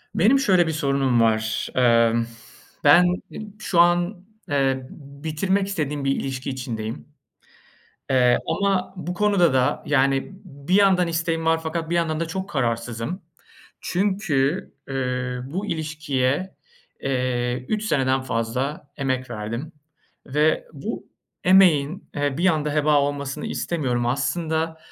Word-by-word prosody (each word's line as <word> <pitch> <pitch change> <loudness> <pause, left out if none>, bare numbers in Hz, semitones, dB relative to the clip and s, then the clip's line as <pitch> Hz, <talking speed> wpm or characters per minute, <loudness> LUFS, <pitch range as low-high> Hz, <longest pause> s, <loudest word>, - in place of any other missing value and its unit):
Benim 240 +9 +4
şöyle 185 -9 +3
bir 160 - 0
sorunum 140 -5 +1
var. 110 -1 +1
Imm, 115 -2 +4 0.6
ben 180 +1 +7 0.3
e - - -8 0.2
şu 190 -5 0
an, 175 +2 +3 0.2
eee, 135 -2 0
b 140 -1 -14
bitirmek 190 +5 0
istediğim 150 -7 -2
bir 135 - +2
ilişki 135 0 -4
içindeyim. 115 - -5 1.0
Eee, 125 -2 +4
ama 195 -2 0
bu 180 0 -4
konuda 195 -4 +3
da 130 +3 +1
yani 135 -2 +2 0.2
b 140 -5 -15
bir 180 - +3
yandan 190 -3 +4
isteğim 165 0 -1
var 165 0 +3
fakat 160 0 -3
bir - - 0
yandan 165 -2 0
da 165 - -1
çok 190 +4 -4
kararsızım. 120 - -2 0.6
Çünkü, 180 -5 0 0.2
ııı, 125 -2 -2
bu 195 +4 -3
ilişkiye, 155 -1 -2 0.4
eee, 125 -2 -1
3 215 0 -1
seneden 135 -8 +1
fazla 130 +4 -3
emek 130 -2 -2
verdim. 115 +8 -5 0.5
Ve 150 - +1
bu - - -6 0.4
emeğin, 180 -4 +4
eee, 145 -1 -1
bir 175 - +2
anda 150 -4 +1
heba 150 -1 +3
olmasını 140 -1 -3
istemiyorum. 125 -8 -1
Aslında 160 +5 -1
145 Hz, 130 wpm, -23 LUFS, 130-175 Hz, 1.0 s, ben